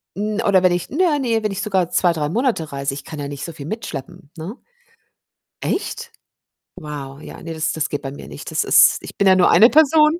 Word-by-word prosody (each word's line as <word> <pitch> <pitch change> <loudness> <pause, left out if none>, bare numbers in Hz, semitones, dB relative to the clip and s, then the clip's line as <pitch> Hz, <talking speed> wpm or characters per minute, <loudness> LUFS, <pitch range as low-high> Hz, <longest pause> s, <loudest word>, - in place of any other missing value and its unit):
'n 210 +2 -2
oder 200 -5 +3
wenn 180 -1 +3
ich 175 - -3
naja, 315 -1 +1
ne, 230 -4 0
wenn 210 - -1
ich 195 - -4
sogar 190 -5 0
2, 175 - +2
3 155 -3 -2
Monate 225 - -1
reise, 140 0 -2
ich 140 - -8
kann 155 -2 -8
ja 145 - -4
nicht 140 -1 -6
so 170 - -7
viel 140 -2 -9
mitschleppen, 150 - -7
ne? 185 +10 -7 1.1
Echt? 470 +4 -3 0.7
Wow, 145 -4 -8
ja, - - -10
ne, 165 -1 -6
das 160 0 -1
das 155 -1 -1
geht 145 - -3
bei 135 - -6
mir 140 - -10
nicht. 75 0 -9
Das - - +1
ist - - +6
ich - - -10
bin 200 - +3
ja 190 - +7
nur 185 - +4
eine 230 - +7
Person. 310 +2 +4
180 Hz, 230 wpm, -20 LUFS, 150-225 Hz, 1.1 s, ja